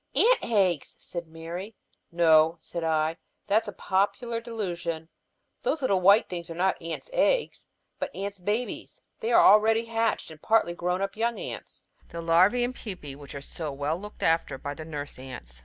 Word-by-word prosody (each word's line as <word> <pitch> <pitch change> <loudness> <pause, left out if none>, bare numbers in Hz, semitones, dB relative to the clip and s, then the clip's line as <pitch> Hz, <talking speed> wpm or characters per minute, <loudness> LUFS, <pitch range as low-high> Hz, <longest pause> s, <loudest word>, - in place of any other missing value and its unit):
"Ants' - - +5
eggs," 190 -9 +1
said 170 -2 -7
Mary. 170 +6 -7 0.4
"No," 165 -1 +5
said 170 +1 -6
I. 160 0 +1 0.3
"That's 220 +2 +2
a - - -3
popular 230 +5 0
delusion. 175 -8 -4 0.5
These 320 - -1
little 195 -7 +2
white 200 +4 +6
things 170 -1 -6
are 165 - -6
not 185 +2 +1
ants' 165 - -6
eggs, - - +1 0.3
but - - -2
ants' 200 0 -4
babies. 210 +7 -3 0.2
They 230 - -2
are - - +7
the - - +6
already 220 +2 +5
hatched 225 -5 -1
and 155 -1 -13
partly 220 -6 +3
grown 180 +3 -1
young 230 +1 -1
ants, - - -7 0.3
the 170 - -8
larvæ 180 +9 +4
and 255 +1 -4
pupæ, 180 - -7
which 145 0 -11
are 140 - -5
so 155 +1 -6
well 145 +4 -2
looked 210 0 -9
after 165 -4 +2
by 145 +2 -5
the 155 +1 -8
nurse 145 -4 -6
ants. 60 - -9
180 Hz, 175 wpm, -27 LUFS, 160-220 Hz, 0.5 s, are